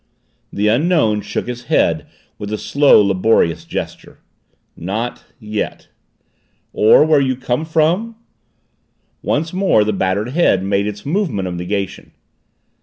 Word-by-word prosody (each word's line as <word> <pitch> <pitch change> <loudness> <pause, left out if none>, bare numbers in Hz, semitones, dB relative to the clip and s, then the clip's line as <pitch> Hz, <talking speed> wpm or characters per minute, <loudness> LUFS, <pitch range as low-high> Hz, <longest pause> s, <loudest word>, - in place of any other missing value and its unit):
The 105 +1 -1
Unknown 115 -3 +2
shook - - -4
his 120 0 -6
head - - +1 0.3
with 105 0 -6
a 110 - -1
slow, 140 -2 +4
laborious 95 -3 +1
gesture. - - -6 0.6
"Not 110 +8 -4
yet." 105 -2 -5 0.8
"Or 110 +7 +5
where 155 -2 +4
you 130 -1 0
came 125 +4 -2
from?" 170 +8 0 1.1
Once 160 +3 -1
more 185 - +3
the 105 0 -1
battered 100 +4 -1
head 130 - +2
made 100 +1 0
its 105 0 -6
movement 145 - -1
of 90 - -4
negation. 95 +2 -4
110 Hz, 125 wpm, -18 LUFS, 100-150 Hz, 1.1 s, Or